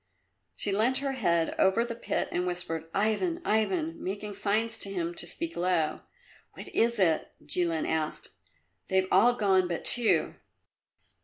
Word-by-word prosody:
She 205 - -2
leant 225 +6 +2
her 275 0 -2
head 170 -11 0
over 190 +5 +3
the 235 - -5
pit 230 - -2
and 180 +1 -1
whispered, 165 -2 -4
"Ivan, 220 - 0
Ivan!" 315 - -1
making 205 +2 -5
signs 215 +3 0
to 200 - -3
him 175 -3 -3
to 170 - -3
speak 330 - -5
low. 175 -3 0 0.6
"What - - -9
is 235 +1 +1
it?" 170 -6 +1 0.2
Jilin 165 +1 0
asked. 160 -1 -3 0.6
"They've 190 -1 +1
all 235 +6 +5
gone 190 -5 +2
but 170 -1 -4
two." 240 -2 +5
195 Hz, 150 wpm, -28 LUFS, 175-230 Hz, 0.6 s, all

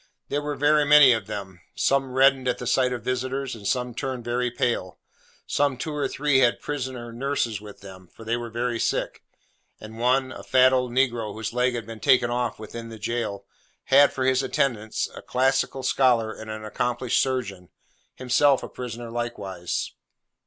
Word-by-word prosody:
There 145 - -1
were 145 0 -3
very 150 +1 +3
many 145 -2 +8
of 110 - -3
them. 95 -3 -7
Some 135 -1 +1
reddened 135 0 +4
at 125 -1 +1
the 125 - -6
sight 125 +1 +2
of 120 -3 -4
visitors, 130 +2 -2
and 105 -4 -7
some 125 -1 -1
turned 130 -1 -4
very 120 +1 0
pale. 115 -6 -2 0.5
Some 140 -2 0
two 150 +5 -4
or 145 -2 -1
three 145 0 +1
had 125 -2 +3
prisoner 130 -5 -5
nurses 120 -4 -2
with 105 -1 -12
them, 95 -2 -12
for 115 - -13
they 115 +1 0
were 120 -1 -5
very 120 +1 -2
sick; - - -1 0.6
and 110 +1 -10
one, 130 +2 +2
a - - -8
fat 130 0 +4
old 125 -1 +1
negro 120 -4 0
whose 110 +1 -5
leg 125 0 +1
had 115 -2 -4
been 115 0 -9
taken 125 -3 +3
off 120 -3 -1
within 115 +2 -8
the 115 - -9
jail, 105 -3 -3 0.5
had 140 +1 +7
for 130 - -2
his 130 0 +3
attendant 110 -5 -1
a - - -8
classical 135 +1 0
scholar 120 -4 +2
and 110 0 -10
an 110 0 -6
accomplished 120 +2 0
surgeon, 115 -9 -3 0.5
himself 130 +2 +3
a - - -6
prisoner 120 -1 -7
likewise. 100 -7 -4
125 Hz, 180 wpm, -25 LUFS, 115-130 Hz, 0.6 s, many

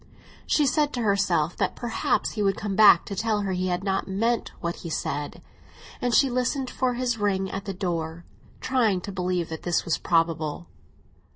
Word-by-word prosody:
She 300 - +3
said 295 +2 +1
to 245 - -2
herself 190 -6 +1
that - - 0
perhaps 240 -2 -1
he 215 - -3
would 195 -2 +1
come 205 -2 -3
back 205 -5 +7
to 200 - -5
tell 215 +1 0
her 195 -1 -2
he 185 0 -1
had 180 +1 -1
not 195 -1 -1
meant 225 +5 0
what 170 0 -3
he 170 - -7
said; 145 -2 -3 0.6
and 245 - 0
she 275 - +5
listened 255 +1 -1
for 255 -1 0
his 245 -2 -1
ring 195 -2 0
at 195 +1 -5
the 195 - -3
door, 170 -3 -3 0.4
trying 225 -8 +1
to 200 - -6
believe 180 -2 -1
that 160 -1 -6
this 175 -2 0
was 170 - 0
probable. 165 -1 0
195 Hz, 190 wpm, -25 LUFS, 175-230 Hz, 0.6 s, back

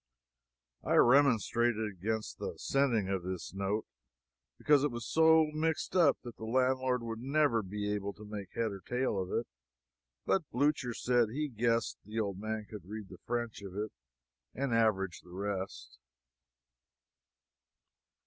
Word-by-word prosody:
I - - +1
remonstrated 120 -3 +4
against 105 +3 -3
the - - -4
sending 125 -8 +1
of 95 -1 -1
this 90 0 -5
note, 100 +2 -1 0.7
because 145 -2 +4
it 145 - +3
was 120 -2 -5
so 160 -1 +5
mixed 160 +3 -1
up 165 -6 +5
that 120 -2 -9
the - - -9
landlord 130 +1 +1
would 115 -1 -4
never 140 -3 +2
be 105 +1 -3
able 100 -1 -2
to 105 - -12
make 105 -3 -6
head 115 -2 0
or 100 - -6
tail 125 -2 -1
of 90 - -5
it; - - 0 0.8
but 180 -6 +1
Blucher 130 -2 +1
said 120 -3 +2
he 150 +6 -2
guessed 115 -1 0
the 110 +3 -4
old 100 -3 -2
man 110 0 -3
could 100 -5 -10
read 105 -2 -6
the - - -11
French 120 -2 -2
of 95 -2 -8
it 105 0 -2 0.6
and 135 -2 -1
average 100 -5 +2
the 90 - -18
rest. 95 -6 -5
115 Hz, 150 wpm, -32 LUFS, 100-130 Hz, 0.8 s, so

